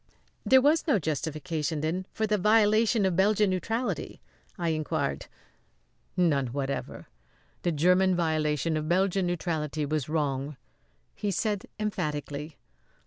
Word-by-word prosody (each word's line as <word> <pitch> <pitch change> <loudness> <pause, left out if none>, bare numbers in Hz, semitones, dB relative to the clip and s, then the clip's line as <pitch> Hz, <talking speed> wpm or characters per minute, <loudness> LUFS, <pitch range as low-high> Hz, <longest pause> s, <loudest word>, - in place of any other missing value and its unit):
"There 260 0 +5
was 310 +4 +3
no 285 - +4
justification, 155 -1 -2
then, 175 +5 -2
for 220 - -1
the 210 -1 +1
violation 215 +1 +4
of 185 -2 +1
Belgian 205 +1 +3
neutrality?" 225 +7 -2 0.4
I 170 -2 -1
inquired. 155 -2 -2 0.9
"None 150 -7 +2
whatever! 135 +1 -4 0.5
The 175 - 0
German 180 +4 +3
violation 155 -2 0
of 155 0 -3
Belgian 190 +1 +2
neutrality 155 -4 -2
was 150 -1 -2
wrong," 145 -2 -1 0.6
he 205 - -3
said 205 +1 -1
emphatically. 150 -7 -3
170 Hz, 120 wpm, -28 LUFS, 150-200 Hz, 0.9 s, There